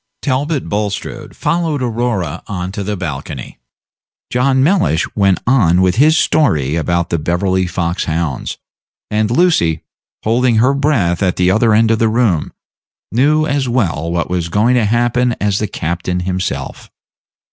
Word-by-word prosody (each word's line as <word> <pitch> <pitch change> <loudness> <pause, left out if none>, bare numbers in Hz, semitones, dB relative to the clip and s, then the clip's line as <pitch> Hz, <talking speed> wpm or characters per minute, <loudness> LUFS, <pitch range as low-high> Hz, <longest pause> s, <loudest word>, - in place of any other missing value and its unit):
Talbot 140 +2 -1
Bulstrode 105 -1 -4
followed 155 -3 -1
Aurora 115 -9 -2
on 90 -2 -4
to 100 +1 -4
the 105 +1 -3
balcony; 75 -7 -6 0.7
John 130 +1 +2
Mellish 170 - +2
went 100 -3 +2
on 100 -9 +3
with 95 +2 +2
his 155 +5 +5
story 75 - +2
about 85 +1 -1
the 85 - 0
Beverly 90 +3 0
fox 85 0 -2
hounds; 80 -4 -3 0.5
and 105 0 +1
Lucy, 115 - +2 0.4
holding 120 +2 +2
her 125 +5 +3
breath 125 - +1
at 95 -3 +1
the 90 0 +2
other 110 +1 +3
end 110 +1 +3
of 110 - +1
the 115 - +2
room, 110 -8 +1 0.6
knew 150 +6 +2
as 140 -3 -1
well 85 - -1
what 85 -1 -1
was 90 -2 -2
going 110 +7 +2
to 120 -3 +2
happen 120 +2 +1
as 100 -1 0
the 105 - -1
captain 90 +1 -3
himself. 90 0 -4
105 Hz, 150 wpm, -16 LUFS, 85-125 Hz, 0.7 s, his